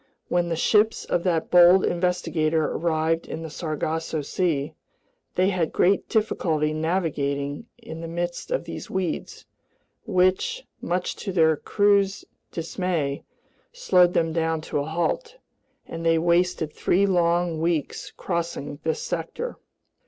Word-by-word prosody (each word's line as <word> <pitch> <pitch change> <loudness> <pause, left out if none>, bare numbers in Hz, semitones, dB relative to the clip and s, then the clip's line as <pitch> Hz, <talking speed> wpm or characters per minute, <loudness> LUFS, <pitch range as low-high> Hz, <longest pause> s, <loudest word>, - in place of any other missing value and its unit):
When 175 -1 +1
the 165 - 0
ships 210 +6 +2
of 175 - 0
that 165 -3 0
bold 180 +1 +7
investigator 170 -3 0
arrived 165 0 0
in 165 - -5
the 160 - -7
Sargasso 160 -1 -3
Sea, 155 -2 -1 0.6
they 185 +1 +3
had 175 -4 0
great 195 +2 +2
difficulty 160 -8 0
navigating 155 -1 -1
in 165 -9 -9
the 165 - -5
midst 175 +1 -4
of - - -1
these - - -7
weeds, 185 -4 -3 0.6
which, 185 - +1 0.2
much 180 +1 -2
to 195 - -4
their 160 -3 +4
crews' 200 +3 +2 0.3
dismay, 165 -4 -2 0.5
slowed 180 - +3
them 165 -1 +1
down 165 -1 0
to 150 - -2
a 140 - -2
halt; 170 - -2 0.5
and 165 0 -6
they 165 0 +3
wasted 170 -1 +1
three 195 +3 +2
long 175 -3 +1
weeks 165 -3 -1
crossing 170 -5 -4
this 160 -1 -2
sector. 175 - -4
170 Hz, 130 wpm, -25 LUFS, 160-185 Hz, 0.6 s, bold